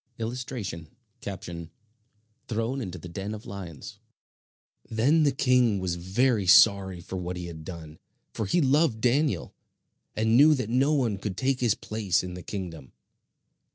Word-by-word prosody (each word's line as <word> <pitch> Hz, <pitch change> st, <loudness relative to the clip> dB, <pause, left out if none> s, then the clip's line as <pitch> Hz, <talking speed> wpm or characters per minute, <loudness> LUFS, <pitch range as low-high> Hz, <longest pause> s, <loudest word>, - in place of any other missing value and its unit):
[Illustration: 115 Hz, -, -5 dB, 1.6 s
Thrown 115 Hz, +4 st, -2 dB
into 95 Hz, -5 st, -5 dB
the 90 Hz, -, -9 dB
den 100 Hz, +5 st, -5 dB
of 105 Hz, -, -11 dB
lions] 90 Hz, -6 st, -8 dB, 0.9 s
Then 130 Hz, +9 st, +3 dB
the 145 Hz, -2 st, +4 dB
king 125 Hz, -5 st, +3 dB
was 95 Hz, -2 st, -2 dB
very 100 Hz, +4 st, +1 dB
sorry 95 Hz, -1 st, +5 dB
for 95 Hz, -, -6 dB
what 90 Hz, 0 st, -4 dB
he 90 Hz, -, -5 dB
had 80 Hz, -2 st, -8 dB
done, 80 Hz, -2 st, -9 dB, 0.3 s
for 110 Hz, -, -3 dB
he 175 Hz, -, +2 dB
loved 140 Hz, -3 st, +3 dB
Daniel, 135 Hz, +6 st, +1 dB, 0.6 s
and 110 Hz, +1 st, +2 dB
knew 150 Hz, +4 st, +7 dB
that 115 Hz, -5 st, -3 dB
no 135 Hz, +4 st, +3 dB
one 115 Hz, -8 st, 0 dB
could 100 Hz, -2 st, -5 dB
take 135 Hz, 0 st, 0 dB
his 120 Hz, -4 st, +2 dB
place 105 Hz, -5 st, -1 dB
in 90 Hz, -1 st, -6 dB
the 90 Hz, -, -7 dB
kingdom. 85 Hz, -8 st, -7 dB
110 Hz, 150 wpm, -27 LUFS, 90-125 Hz, 1.6 s, knew